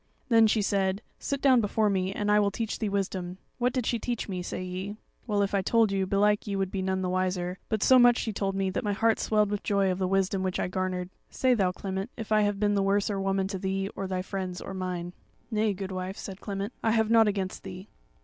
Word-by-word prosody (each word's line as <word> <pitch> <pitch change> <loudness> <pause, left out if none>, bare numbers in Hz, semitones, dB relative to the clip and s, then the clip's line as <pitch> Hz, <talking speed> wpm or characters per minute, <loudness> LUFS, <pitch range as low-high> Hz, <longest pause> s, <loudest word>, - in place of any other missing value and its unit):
"Then 225 -2 +6
she 215 -1 +2
said: 195 +1 0 0.2
'Sit 280 -1 -3
down 260 -4 +6
before 215 +1 +1
me, 190 -2 0
and 205 +1 -1
I 210 - +5
will 205 -1 +3
teach 225 +1 -3
thee 215 - -1
wisdom.' 185 -2 -2 0.2
What 245 +1 +2
did 255 -3 -1
she 235 - 0
teach 240 0 -3
me? 185 -3 -3
say 185 - -4
ye. 185 +3 -5 0.3
Well, 205 -2 +2
if 200 - -2
I 200 - +2
told 225 +2 +3
you 195 -1 0
belike 205 +2 +2
ye 200 - -2
would 195 -1 -1
be 195 - -2
none 190 0 -1
the 185 - -1
wiser; 185 0 -1
but 220 -3 0
so 260 -1 +7
much 245 0 +6
she 220 - -2
told 195 -1 -1
me, 195 -1 0
that - - -2
my 205 -1 0
heart 225 +2 +2
swelled 210 -2 +2
with 205 - -1
joy 200 -2 +1
of 185 - -3
the 185 - +1
wisdom 195 0 +1
which 185 -1 -1
I - - 0
garnered. 185 0 -2 0.2
Say 255 -1 +2
thou, 195 -6 +2
Clement, 190 +3 -4
if 220 -1 -7
I 215 0 +5
have 205 -1 0
been 205 0 +2
the 200 - +2
worser 200 0 +1
woman 195 0 0
to 195 -2 -4
thee, 195 +1 -2
or 195 - -3
thy 185 -1 -2
friends, 185 -2 -4
or - - -7
mine." 180 -2 -4 0.4
"Nay, 215 -1 +2
goodwife," 190 -1 -5
said 195 -1 -8
Clement, 200 0 -4
"I 225 - +2
have 220 -1 +2
nought 225 -1 +6
against 195 -2 -2
thee." 190 +1 -9
195 Hz, 250 wpm, -28 LUFS, 190-210 Hz, 0.4 s, so